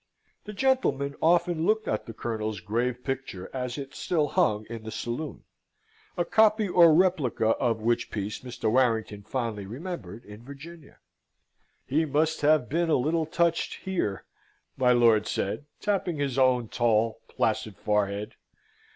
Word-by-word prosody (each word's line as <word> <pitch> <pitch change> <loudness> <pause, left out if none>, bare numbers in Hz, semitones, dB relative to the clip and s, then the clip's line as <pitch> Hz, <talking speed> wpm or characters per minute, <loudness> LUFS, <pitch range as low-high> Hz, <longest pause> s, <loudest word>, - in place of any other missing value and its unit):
The 210 - -7
gentleman 230 - +1
often 170 0 +2
looked 215 +4 +1
at - - -2
the 115 - -7
Colonel's 110 -3 -3
grave 120 +6 -2
picture 135 -9 -5
as 125 -1 -3
it 140 -1 -7
still 155 -5 0
hung 105 -3 +1
in 115 -1 -7
the 110 - -7
saloon, 120 +7 -5 0.7
a 175 - +1
copy 215 +1 +4
or 175 -2 +6
replica 155 -10 +2
of 115 -4 0
which 120 +1 +1
piece 105 0 -4
Mr. 125 -3 -3
Warrington 115 -4 +1
fondly 110 -2 -4
remembered 120 - -7
in 105 +2 -12
Virginia. 145 +4 -12 0.9
"He 155 +4 +1
must 155 +2 0
have 150 -3 +3
been 170 +2 0
a - - +4
little 155 +4 0
touched 170 0 0
here," 175 - -2 0.5
my 125 -2 +3
lord 115 -3 +4
said, 100 +9 -2
tapping 190 -5 -1
his 140 -3 -1
own 125 -3 +3
tall, 115 -1 +1
placid 110 -2 -1
forehead. 105 0 -1
130 Hz, 145 wpm, -27 LUFS, 110-160 Hz, 0.9 s, or